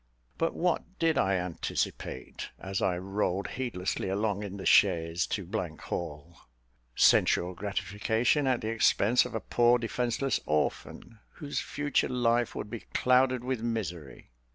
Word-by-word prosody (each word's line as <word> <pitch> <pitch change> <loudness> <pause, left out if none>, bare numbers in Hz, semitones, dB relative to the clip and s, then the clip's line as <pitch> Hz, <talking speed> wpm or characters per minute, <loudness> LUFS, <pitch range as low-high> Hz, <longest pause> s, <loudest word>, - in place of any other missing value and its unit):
But 165 - 0
what 180 +2 -1
did 165 -1 +2
I 95 0 +2
anticipate, 90 -2 -4
as 95 0 -4
I 90 -2 +1
rolled 95 0 -2
heedlessly 100 -8 -3
along 100 +1 -1
in 100 -1 -6
the 95 - -7
chaise 80 +1 +3
to 100 -5 -3 0.3
Hall? 85 0 -6 0.6
Sensual 90 +1 +4
gratification 105 - 0
at 130 -2 +1
the 110 - -3
expense 115 +1 +3
of - - -6
a - - 0
poor 120 +1 +3
defenceless 120 +3 -1
orphan, 75 +8 -2
whose 145 -2 -4
future 145 -1 -1
life 120 -1 +1
would 105 - -5
be 115 - -4 0.2
clouded 130 -1 +3
with 130 -2 -2
misery. 90 - -5
110 Hz, 135 wpm, -29 LUFS, 95-125 Hz, 0.6 s, Sensual